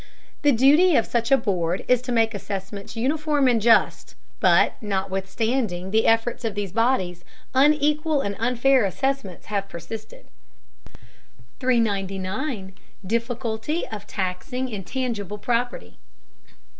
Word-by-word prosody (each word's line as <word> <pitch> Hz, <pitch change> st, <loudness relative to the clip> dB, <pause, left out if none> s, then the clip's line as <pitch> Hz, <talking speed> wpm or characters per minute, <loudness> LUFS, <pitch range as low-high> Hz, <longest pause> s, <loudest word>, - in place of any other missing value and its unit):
The 290 Hz, -, +4 dB
duty 290 Hz, +8 st, +5 dB
of 230 Hz, -, +3 dB
such 235 Hz, 0 st, -1 dB
a 270 Hz, -, +7 dB
board 185 Hz, -7 st, -1 dB
is 250 Hz, -1 st, +3 dB
to 250 Hz, 0 st, -5 dB
make 225 Hz, -1 st, +2 dB
assessments 200 Hz, +1 st, -6 dB
uniform 290 Hz, +3 st, +1 dB
and 235 Hz, -3 st, +3 dB
just, 230 Hz, +1 st, +3 dB, 0.2 s
but -, -, +4 dB
notwithstanding 195 Hz, 0 st, -2 dB
the 220 Hz, +1 st, +3 dB
efforts 225 Hz, +2 st, +1 dB
of 220 Hz, -3 st, -2 dB
these 205 Hz, -3 st, -3 dB
bodies, 190 Hz, -6 st, 0 dB, 0.3 s
unequal 300 Hz, +2 st, +3 dB
and 200 Hz, -4 st, -3 dB
unfair 250 Hz, +2 st, +3 dB
assessments 200 Hz, 0 st, -2 dB
have 200 Hz, -1 st, -1 dB
persisted. 210 Hz, +7 st, -9 dB, 1.3 s
399. 200 Hz, -1 st, -1 dB, 0.3 s
DIFFICULTY 235 Hz, -, -2 dB
OF 210 Hz, -2 st, -7 dB
TAXING 195 Hz, +8 st, -3 dB
INTABGIBLE 210 Hz, -1 st, -4 dB
PROPERTY. 245 Hz, +3 st, -2 dB
225 Hz, 115 wpm, -24 LUFS, 195-260 Hz, 1.3 s, a